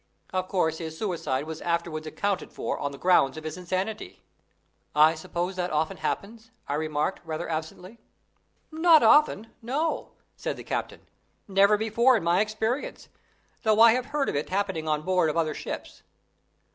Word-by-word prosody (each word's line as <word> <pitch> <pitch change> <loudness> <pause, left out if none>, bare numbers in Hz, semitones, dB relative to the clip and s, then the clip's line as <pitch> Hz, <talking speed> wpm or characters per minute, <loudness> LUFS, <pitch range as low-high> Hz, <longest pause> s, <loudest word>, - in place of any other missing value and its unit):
Of 185 0 -1
course 160 -4 0
his 160 -1 -6
suicide 165 -9 -2
was 160 0 -7
afterwards 170 -2 -2
accounted 200 +5 -2
for - - -3
on 140 - -2
the 140 - -9
ground 155 -6 +3
of 155 - -7
his 155 - -5
insanity." 185 +4 -4 0.7
"I 155 +2 +6
suppose 175 +3 -4
that 180 0 -1
often 155 0 -1
happens?" 225 +2 -4 0.2
I - - -2
remarked, 150 +3 -1
rather 160 +1 -4
absently. 170 +7 -6 0.7
"Not 320 0 +5
often 225 -7 +4
no," 285 +8 -2 0.2
said - - -4
the - - -8
captain; - - -4 0.5
"never 200 +1 +4
before 230 +4 +3
in - - -4
my 170 +3 +3
experience, 220 +5 -3 0.5
though 220 -1 +2
I 230 0 +9
have 250 +2 0
heard 290 -2 -1
of - - -2
it 145 - -2
happening 190 -5 -1
on 155 -1 0
board 180 -2 +2
of 155 - -2
other 155 -2 +1
ships. - - -7
180 Hz, 165 wpm, -26 LUFS, 160-220 Hz, 0.7 s, I